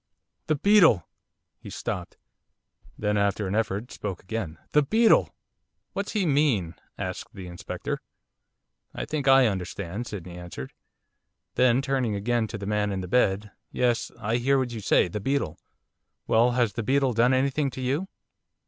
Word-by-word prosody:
'The 155 - +2
beetle!' 165 - +5 0.5
He - - -10
stopped. 90 -2 -5 0.8
Then, 105 0 0
after 100 +1 +1
an 95 - -2
effort, 110 +1 -1
spoke 95 -4 -5
again. 95 -4 -4
'The 150 - +5
beetle!' 220 +10 +4 0.6
'What's 200 +1 -3
he 205 -4 +1
mean?' 135 - +2 0.2
asked - - -5
the 95 - -7
Inspector. 90 0 -5 0.9
'I - - -3
think 150 -3 -3
I 135 -1 +7
understand,' 100 +1 -3
Sydney 90 -4 -7
answered; 85 -7 -8 0.8
then 125 +1 +3
turning 130 -6 0
again 115 +2 0
to 110 - -6
the 100 - -6
man 105 0 0
in 95 -1 -2
the 90 - -6
bed. 100 -1 +1 0.2
'Yes, 120 -2 0
I 110 +2 0
hear 135 +3 +2
what 130 -2 -1
you 115 - -5
say, 100 - +3
the 95 +5 -4
beetle. 120 - -1 0.7
Well, 120 +2 +3
has 120 -4 +1
the 120 - -2
beetle 135 +3 +2
done 120 +3 +4
anything 140 +2 +1
to 130 - -7
you? 140 +9 -1
115 Hz, 155 wpm, -26 LUFS, 100-135 Hz, 0.9 s, I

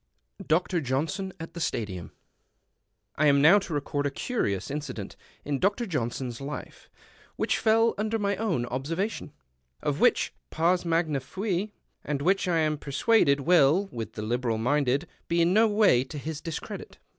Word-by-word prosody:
27 195 - -10
DR. 175 +2 +1
JOHNSON 155 +9 -2
AT 165 - -8
THE 170 - -7
STADIUM 100 - -3 1.1
I 150 - +4
AM 140 -1 +5
now 165 +8 +7
to 190 - -8
record 145 0 -1
a - - 0
curious 135 - -2
incident 150 +1 -5 0.3
in 140 -2 -1
Dr. 200 - +1
Johnson's 125 - -3
life, 145 +2 -7 0.5
which - - 0
fell 225 +1 +3
under 220 +1 0
my 200 -2 0
own 185 - 0
observation; 150 - -3 0.5
of - - -1
which - - +3 0.2
2)ars 175 +3 +1
magna 165 -4 +1
fui, 195 - -3 0.3
and 140 -1 -2
which 190 +3 +2
I 175 -2 +2
am 155 -1 0
persuaded 140 -1 +2
will, 170 +4 +4
with 115 -2 -6
the 105 - -5
liberal 120 0 -1
minded, 140 +4 +1 0.2
be 170 - +1
in 175 +2 +3
no 220 +2 +5
way 205 - +4
to 150 - -8
his 155 +2 -5
discredit. 165 -2 -7
155 Hz, 160 wpm, -27 LUFS, 135-190 Hz, 1.1 s, now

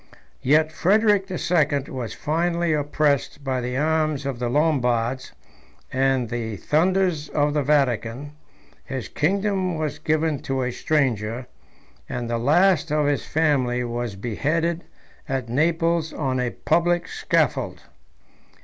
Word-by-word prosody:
Yet 155 +3 +3
Frederic 205 +2 +3
the 185 -2 -4
Second 145 -5 +1
was 125 -4 -5
finally 170 +1 0
oppressed 145 -1 0
by 130 -2 -1
the 125 +1 -3
arms 155 -1 0
of 135 -3 -3
the 120 -1 -1
Lombards 130 -4 +1 0.6
and 130 -2 +1
the 115 -2 -3
thunders 170 - +1
of 145 0 +1
the 150 - +1
Vatican: 135 -1 0 0.5
his 130 -7 -5
kingdom 190 - 0
was 155 -2 -3
given 155 -1 0
to 135 0 -2
a 125 - -1
stranger, 125 -5 0 0.6
and 120 -1 -3
the 115 0 -1
last 160 +5 +3
of 150 -1 +2
his 145 -1 0
family 130 -6 +1
was 120 -3 -3
beheaded 155 - -1 0.4
at 130 -3 -2
Naples 165 +4 +1
on 130 -4 -1
a 125 -1 0
public 175 +6 +1
scaffold. 440 0 0
145 Hz, 130 wpm, -23 LUFS, 125-160 Hz, 0.6 s, Yet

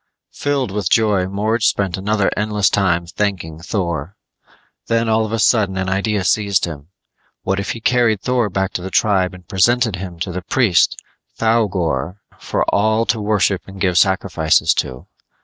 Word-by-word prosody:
Filled 140 -6 -2
with 100 -2 -2
joy, 105 -5 +2
Morge 105 +3 0
spent 95 -4 0
another 100 +1 0
endless 105 -2 +1
time 90 -4 +1
thanking 90 -4 -3
Thor. 85 -2 -3 0.7
Then 115 0 +1
all 110 0 +2
of - - -9
a 115 - 0
sudden 105 -4 +2
an 95 0 -1
idea 100 +1 0
seized 100 -1 +1
him. 75 -4 -8 0.6
What 95 +1 -1
if 100 - -3
he 115 - -9
carried 120 -3 +2
Thor 125 -1 0
back 95 0 -2
to - - -3
the 95 - -5
tribe 95 -2 +1
and 90 -2 -16
presented 115 +2 +2
him 90 -2 -7
to 90 - -2
the 90 +1 -4
priest, 95 -4 +2 0.4
Thougor, 95 - 0 0.2
for - - -1
all 110 +2 +2
to 115 -2 0
worship 105 -3 +1
and 95 0 -11
give 90 -2 +1
sacrifices 90 -5 +2
to? 65 -1 -4
100 Hz, 165 wpm, -18 LUFS, 90-110 Hz, 0.7 s, joy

